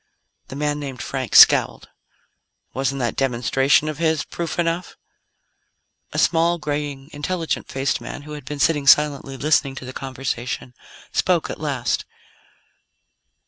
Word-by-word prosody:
The -, -, -8 dB
man 150 Hz, +1 st, -1 dB
named 135 Hz, -3 st, -6 dB
Frank 130 Hz, -3 st, -4 dB
scowled. -, -, +6 dB, 0.8 s
"Wasn't 135 Hz, +1 st, -1 dB
that 120 Hz, -4 st, -1 dB
demonstration 135 Hz, +3 st, +2 dB
of 155 Hz, -1 st, -4 dB
his 160 Hz, -2 st, +1 dB
proof 170 Hz, -2 st, -5 dB
enough?" 170 Hz, +1 st, -1 dB, 1.2 s
A -, -, -6 dB
small, 170 Hz, +1 st, +3 dB
graying, 145 Hz, -2 st, -4 dB
intelligent 165 Hz, +3 st, -3 dB
faced 135 Hz, -2 st, -1 dB
man 130 Hz, +4 st, -7 dB
who 150 Hz, -, -11 dB
had 150 Hz, -3 st, -8 dB
been 150 Hz, +3 st, -5 dB
sitting 145 Hz, -1 st, +1 dB
silently, 140 Hz, -2 st, +4 dB
listening 140 Hz, -1 st, +1 dB
to 130 Hz, -, -8 dB
the 130 Hz, -, -8 dB
conversation, 130 Hz, -2 st, -4 dB, 0.4 s
spoke -, -, +1 dB
at -, -, -7 dB
last. -, -, -1 dB
145 Hz, 135 wpm, -22 LUFS, 135-155 Hz, 1.2 s, scowled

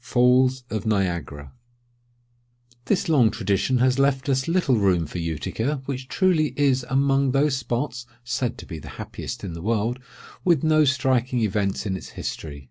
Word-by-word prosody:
UTICA. 110 Hz, -, +1 dB, 1.3 s
This 190 Hz, +5 st, 0 dB
long 135 Hz, -9 st, +4 dB
tradition 100 Hz, +6 st, 0 dB
has 130 Hz, +2 st, +2 dB
left 140 Hz, 0 st, +1 dB
us 130 Hz, +1 st, +1 dB
little 165 Hz, -8 st, +2 dB
room 95 Hz, -5 st, +2 dB
for 90 Hz, -, -6 dB
Utica, 110 Hz, -, -3 dB
which 130 Hz, -1 st, -5 dB
truly 160 Hz, -7 st, +1 dB
is 135 Hz, -3 st, +2 dB
among 135 Hz, 0 st, +2 dB
those 140 Hz, 0 st, +2 dB
spots 125 Hz, -1 st, -3 dB, 0.2 s
(said 120 Hz, 0 st, -2 dB
to -, -, -10 dB
be 80 Hz, -4 st, -7 dB
the -, -, -10 dB
happiest -, -, -7 dB
in 95 Hz, -4 st, -5 dB
the 85 Hz, -, -7 dB
world) 115 Hz, +4 st, -1 dB, 0.4 s
with 170 Hz, -6 st, +3 dB
no 155 Hz, -1 st, +4 dB
striking 130 Hz, -2 st, +1 dB
events 100 Hz, -1 st, -1 dB
in 95 Hz, -2 st, -1 dB
its 95 Hz, -, -8 dB
history. 75 Hz, -3 st, -5 dB
125 Hz, 150 wpm, -24 LUFS, 100-135 Hz, 1.3 s, long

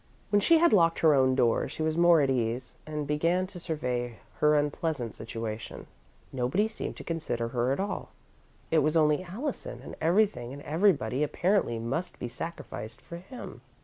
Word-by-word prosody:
When 205 Hz, -, +5 dB
she 330 Hz, +11 st, +5 dB
had 340 Hz, -3 st, +4 dB
locked 165 Hz, -4 st, +4 dB
her 160 Hz, -2 st, +6 dB
own 130 Hz, -2 st, +4 dB
door, 120 Hz, -3 st, +2 dB
she 155 Hz, -, -4 dB
was 155 Hz, 0 st, 0 dB
more 170 Hz, -1 st, +6 dB
at 140 Hz, -, +2 dB
ease, 120 Hz, 0 st, -1 dB
and 150 Hz, -1 st, -3 dB
began 165 Hz, +5 st, +1 dB
to 185 Hz, -1 st, -10 dB
survey 125 Hz, -8 st, -3 dB, 0.2 s
her 150 Hz, 0 st, +4 dB
unpleasant 145 Hz, -4 st, -1 dB
situation. 110 Hz, -1 st, -6 dB, 0.5 s
Nobody 135 Hz, -, +1 dB
seemed 220 Hz, -, -6 dB
to -, -, -8 dB
consider 150 Hz, -9 st, -2 dB
her 125 Hz, +1 st, 0 dB
at 135 Hz, -, 0 dB
all 200 Hz, +1 st, -3 dB, 0.6 s
it 160 Hz, -, +5 dB
was 155 Hz, +2 st, +2 dB
only 150 Hz, 0 st, +3 dB
Allison, 200 Hz, -, -5 dB
and -, -, -8 dB
everything 170 Hz, -, +2 dB
and 145 Hz, +1 st, -9 dB
everybody, 150 Hz, -, +2 dB
apparently, 150 Hz, -, +1 dB
must 120 Hz, +11 st, -3 dB
be 125 Hz, -, -4 dB
sacrificed 120 Hz, -5 st, -7 dB
for 170 Hz, -, -9 dB
him. 195 Hz, +9 st, -10 dB
150 Hz, 175 wpm, -29 LUFS, 125-175 Hz, 0.6 s, her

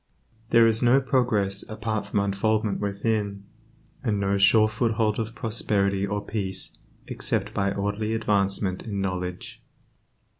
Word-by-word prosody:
There 115 Hz, -1 st, +6 dB
is 110 Hz, 0 st, +3 dB
no 125 Hz, +2 st, +5 dB
progress 115 Hz, -7 st, +1 dB
apart 110 Hz, -1 st, -3 dB
from 100 Hz, -, 0 dB
unfoldment 105 Hz, +1 st, 0 dB
within, 100 Hz, 0 st, -2 dB, 0.6 s
and 105 Hz, -5 st, 0 dB
no 100 Hz, 0 st, +1 dB
sure 110 Hz, +2 st, +6 dB
foothold 110 Hz, -1 st, 0 dB
of 110 Hz, +1 st, -4 dB
prosperity 100 Hz, -3 st, 0 dB
or 100 Hz, +1 st, -3 dB
peace 95 Hz, -4 st, -4 dB, 0.3 s
except -, -, -2 dB
by 100 Hz, 0 st, 0 dB
orderly 105 Hz, +3 st, -2 dB
advancement 100 Hz, -3 st, 0 dB
in 100 Hz, -3 st, -4 dB
knowledge. 90 Hz, -2 st, -4 dB
105 Hz, 125 wpm, -25 LUFS, 100-110 Hz, 0.6 s, There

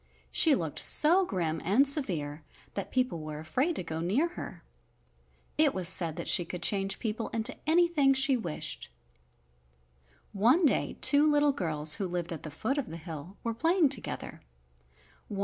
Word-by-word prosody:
She 315 Hz, -4 st, +4 dB
looked 160 Hz, -5 st, -4 dB
so 345 Hz, +6 st, +5 dB
grim 165 Hz, -4 st, -3 dB
and 230 Hz, +11 st, +2 dB
severe 165 Hz, -, +1 dB, 0.3 s
that 200 Hz, -, -6 dB
people 255 Hz, -9 st, -1 dB
were 155 Hz, -1 st, -8 dB
afraid 260 Hz, -, -2 dB
to -, -, -4 dB
go 160 Hz, -1 st, -6 dB
near 215 Hz, -, 0 dB
her. 350 Hz, -, -10 dB, 1.0 s
It 305 Hz, -3 st, +3 dB
was 185 Hz, -2 st, +1 dB
said 170 Hz, -3 st, +1 dB
that -, -, -6 dB
she 175 Hz, -, +4 dB
could 175 Hz, +1 st, -8 dB
change 195 Hz, -1 st, +1 dB
people 225 Hz, 0 st, -4 dB
into 225 Hz, -1 st, +1 dB
anything 320 Hz, -5 st, +2 dB
she 270 Hz, 0 st, +2 dB
wished. 175 Hz, -10 st, -6 dB, 1.4 s
One 245 Hz, -, +2 dB
day 285 Hz, -, 0 dB
two 295 Hz, +1 st, +5 dB
little 290 Hz, -1 st, +2 dB
girls 155 Hz, -, +2 dB
who 190 Hz, -, -2 dB
lived 175 Hz, -1 st, -3 dB
at 160 Hz, -, -8 dB
the 155 Hz, -, -8 dB
foot 220 Hz, -, -3 dB
of 260 Hz, -, -5 dB
the 165 Hz, -, -8 dB
hill 165 Hz, +2 st, -10 dB
were 230 Hz, -, -3 dB
playing 330 Hz, +5 st, +1 dB
together. 260 Hz, -6 st, -3 dB
210 Hz, 165 wpm, -28 LUFS, -, 1.4 s, so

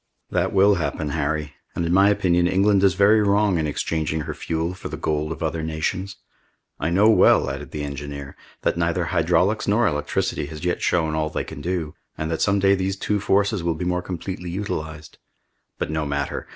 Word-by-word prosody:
"That -, -, +1 dB
will 100 Hz, 0 st, +4 dB
happen, 75 Hz, 0 st, -2 dB
Harry; 75 Hz, 0 st, -2 dB, 0.2 s
and 85 Hz, -, -1 dB
in 85 Hz, -, 0 dB
my 100 Hz, +2 st, +6 dB
opinion 90 Hz, -3 st, +2 dB
England 100 Hz, +2 st, +3 dB
is 95 Hz, -3 st, +4 dB
very 105 Hz, +3 st, +5 dB
wrong 100 Hz, -3 st, +2 dB
in 80 Hz, -, 0 dB
exchanging 80 Hz, +1 st, -2 dB
her -, -, -4 dB
fuel 80 Hz, +2 st, -2 dB
for 95 Hz, -, -8 dB
the -, -, -5 dB
gold 75 Hz, 0 st, -1 dB
of 80 Hz, -, -5 dB
other 80 Hz, 0 st, -1 dB
nations! 80 Hz, +5 st, -3 dB, 0.6 s
I 75 Hz, -, 0 dB
know 100 Hz, +5 st, +4 dB
well," 90 Hz, -, +5 dB
added 70 Hz, 0 st, -7 dB
the 75 Hz, -1 st, -5 dB
engineer, 70 Hz, -1 st, -6 dB, 0.3 s
"that -, -, +1 dB
neither 85 Hz, +1 st, 0 dB
hydraulics 90 Hz, +5 st, +1 dB
nor 110 Hz, +4 st, +3 dB
electricity 75 Hz, -3 st, -1 dB
has 75 Hz, +2 st, -7 dB
yet 90 Hz, -, 0 dB
shown 80 Hz, -3 st, +1 dB
all 80 Hz, 0 st, 0 dB
they -, -, -3 dB
can 70 Hz, -, -9 dB
do, 85 Hz, -2 st, -2 dB, 0.2 s
and 80 Hz, +1 st, -3 dB
that 80 Hz, -, -2 dB
some 100 Hz, +1 st, +3 dB
day 100 Hz, 0 st, +4 dB
these 95 Hz, 0 st, -1 dB
two 105 Hz, +1 st, -1 dB
forces 100 Hz, 0 st, +1 dB
will 85 Hz, -1 st, 0 dB
be 90 Hz, -, -4 dB
more 90 Hz, 0 st, 0 dB
completely 90 Hz, 0 st, -5 dB
utilized. 80 Hz, -5 st, -5 dB, 0.6 s
But -, -, -3 dB
no 80 Hz, -1 st, -1 dB
matter! 70 Hz, 0 st, -3 dB
85 Hz, 200 wpm, -23 LUFS, 75-95 Hz, 0.6 s, my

